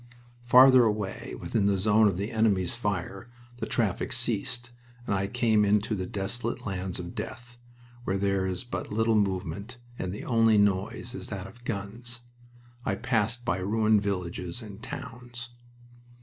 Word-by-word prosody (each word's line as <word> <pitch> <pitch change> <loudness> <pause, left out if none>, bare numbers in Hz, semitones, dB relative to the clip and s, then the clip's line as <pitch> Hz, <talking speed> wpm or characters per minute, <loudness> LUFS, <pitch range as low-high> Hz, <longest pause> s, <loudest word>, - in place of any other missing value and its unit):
Farther 130 +1 +8
away 105 -3 -2
within 100 -3 +1
the 100 -1 +3
zone 105 +3 +4
of 95 -3 0
the 100 +3 -3
enemy's 105 -6 +2
fire 100 -1 -3 0.3
the 110 - -4
traffic 110 +2 0
ceased, 120 0 -1 0.3
and - - 0
I 100 0 0
came 110 -1 +3
into 105 +2 +2
the 95 -3 -2
desolate 115 +6 -2
lands 95 -2 -3
of 85 +2 -6
death, 120 +2 -7 0.4
where 95 -4 0
there 100 -1 +1
is 90 +3 -2
but 120 - -5
little 110 +1 +2
movement, 100 +2 -1 0.2
and 95 - -2
the 100 - -6
only 115 -3 +4
noise 100 +4 +1
is - - -4
that 95 -3 -5
of 120 +6 -13
guns. 115 +4 -4 0.6
I 95 - 0
passed 115 +2 0
by 115 -6 +1
ruined 110 +2 +3
villages 90 +1 -3
and 105 -1 -10
towns. 120 -1 -7
105 Hz, 155 wpm, -28 LUFS, 95-120 Hz, 0.6 s, Farther